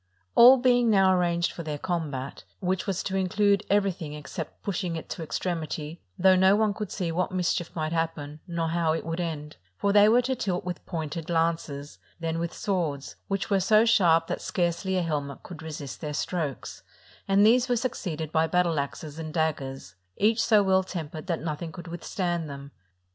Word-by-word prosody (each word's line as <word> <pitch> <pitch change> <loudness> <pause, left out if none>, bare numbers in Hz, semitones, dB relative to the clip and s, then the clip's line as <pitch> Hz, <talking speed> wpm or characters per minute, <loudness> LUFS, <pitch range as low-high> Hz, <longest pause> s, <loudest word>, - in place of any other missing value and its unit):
All 250 +3 +9
being 245 -2 +3
now 195 -3 +5
arranged 170 -1 +1
for - - -7
their 155 -2 -4
combat, 145 -6 -4 0.2
which 185 0 -1
was 190 -2 -1
to 190 - -3
include 200 +2 +2
everything 190 -7 0
except 150 -1 -7
pushing 180 -4 -2
it 160 - -7
to - - -5
extremity, 160 -1 -4 0.2
though 190 +1 +5
no 190 +2 +5
one 215 -1 +2
could 210 -1 -5
see 175 -4 -2
what 180 +3 -1
mischief 180 -1 0
might 155 0 -2
happen, 160 -3 -3
nor 170 -2 -1
how 165 -1 +1
it 165 - -3
would 165 +1 -3
end; 155 -3 -4 0.2
for 200 - +1
they 205 0 +7
were 245 +3 +4
to 260 +1 0
tilt 185 -6 -2
with 180 -1 -5
pointed 160 -1 -4
lances, 165 -4 -1 0.2
then 165 0 -2
with 170 0 -2
swords, 165 -8 -2
which 195 +1 -2
were 195 - +4
so 215 +4 +4
sharp 175 -8 +4
that - - -4
scarcely 180 +1 -1
a 180 - +1
helmet 145 -4 -3
could 170 -3 -9
resist 150 -4 -7
their 150 -2 -4
strokes; 155 -5 -3 0.5
and 200 +1 +5
these 245 +3 +4
were 245 - +3
succeeded 165 - -3
by 160 0 +2
battle 175 -3 +2
axes 145 +2 -5
and 155 0 -6
daggers, 135 - -2 0.2
each 220 +2 +3
so 215 -3 +5
well 190 -1 +4
tempered 160 -2 -6
that 170 -4 -2
nothing 160 +1 -4
could 175 -1 -9
with 170 0 -7
stand 175 -4 -2
them. 140 0 -8
170 Hz, 190 wpm, -27 LUFS, 160-195 Hz, 0.5 s, All